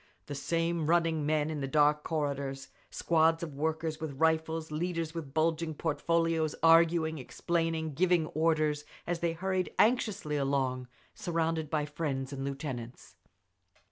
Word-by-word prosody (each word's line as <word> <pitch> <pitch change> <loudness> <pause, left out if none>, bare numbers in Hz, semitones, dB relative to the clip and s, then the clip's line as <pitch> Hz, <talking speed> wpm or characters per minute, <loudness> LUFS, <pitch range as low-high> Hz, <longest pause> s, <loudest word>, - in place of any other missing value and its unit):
The 145 - -6
same 165 +2 -1
running 165 -3 +2
men 155 0 +1
in 150 -2 -4
the 135 - -2
dark 150 +1 +3
corridors, 140 -3 -3 0.2
squads 165 0 +2
of 155 -4 -5
workers 160 +2 -2
with 145 -4 -5
rifles, 160 0 +1
leaders 165 0 -2
with 160 -5 -6
bulging 160 +1 0
portfolios 165 0 0
arguing, 165 -1 +5
explaining, 165 +3 -2
giving 175 +1 +3
orders 155 -2 +1 0.2
as 175 -1 -2
they 170 -1 0
hurried 185 +1 -1
anxiously 210 -9 +2
along, 135 -2 0 0.3
surrounded 165 -2 -1
by 150 -2 0
friends 145 -3 -3
and 135 -1 -4
lieutenants. 135 -4 -6
160 Hz, 135 wpm, -31 LUFS, 145-165 Hz, 0.3 s, arguing